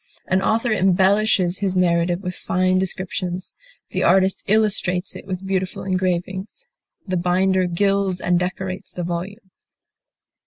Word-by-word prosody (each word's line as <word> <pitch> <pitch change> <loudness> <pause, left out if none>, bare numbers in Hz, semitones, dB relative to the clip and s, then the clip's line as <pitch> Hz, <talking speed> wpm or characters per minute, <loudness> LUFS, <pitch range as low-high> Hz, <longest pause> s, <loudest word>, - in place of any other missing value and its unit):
An 185 +1 +1
author 230 +3 +1
embellishes 190 -1 +3
his 195 -2 -1
narrative 175 0 +2
with 180 -1 -3
fine 185 +1 +1
descriptions, 185 -1 -3 0.4
the - - -1
artist 190 +1 +3
illustrates 195 -3 +1
it - - -10
with 190 0 -4
beautiful 190 -1 -2
engravings, 185 - -2 0.4
the 185 -2 -1
binder 185 +2 +2
gilds 195 +1 +1
and 175 -1 +2
decorates 185 +1 -4
the 180 - -4
volume. 180 +3 -5
185 Hz, 125 wpm, -21 LUFS, 180-195 Hz, 0.4 s, embellishes